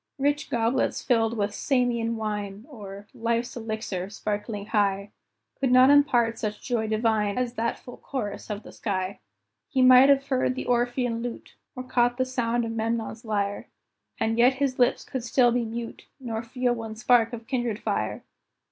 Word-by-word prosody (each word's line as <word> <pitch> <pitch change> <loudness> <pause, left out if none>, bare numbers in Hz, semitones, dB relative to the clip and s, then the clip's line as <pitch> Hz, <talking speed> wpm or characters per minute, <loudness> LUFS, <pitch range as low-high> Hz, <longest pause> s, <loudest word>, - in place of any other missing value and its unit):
Rich 290 +2 0
goblets 235 +2 0
filled 230 -2 +1
with 205 0 0
"Samian 240 -4 0
wine," 210 -1 -4
Or 200 -6 -9
"Life's 235 +1 -1
elixir, 220 -5 -4
sparkling 210 0 -4
high," 200 -2 0 0.5
Could 265 -2 +1
not 255 +2 +7
impart 240 -6 +3
such 215 -1 -3
joy 235 -4 -1
divine 215 -1 +1
As 250 -1 -1
that 230 -1 -1
full 245 - -12
chorus 230 -8 -5
of 210 0 -4
the - - -11
sky. 190 -2 -3 0.5
He 260 -3 +2
might 255 +1 +8
have 275 -1 +4
heard 255 -1 +1
the - - -4
Orphean 245 -1 0
lute, 240 -1 -6 0.2
Or 255 - -5
caught 245 -1 +1
the 255 - +1
sound 240 -2 -1
of 225 - -4
Memnon's 225 0 -2
lyre, 205 -2 -2 0.5
And 225 +1 0
yet 250 +2 +5
his 265 -1 -1
lips 245 - +3
could 260 -3 -4
still 245 0 +3
be 240 0 0
mute, 230 +1 -6
Nor 230 -4 -4
feel 245 +1 -1
one 225 -2 -6
spark 230 0 +3
of 235 -1 -7
kindred 240 -4 -1
fire. - - -2
230 Hz, 170 wpm, -26 LUFS, 220-250 Hz, 0.5 s, might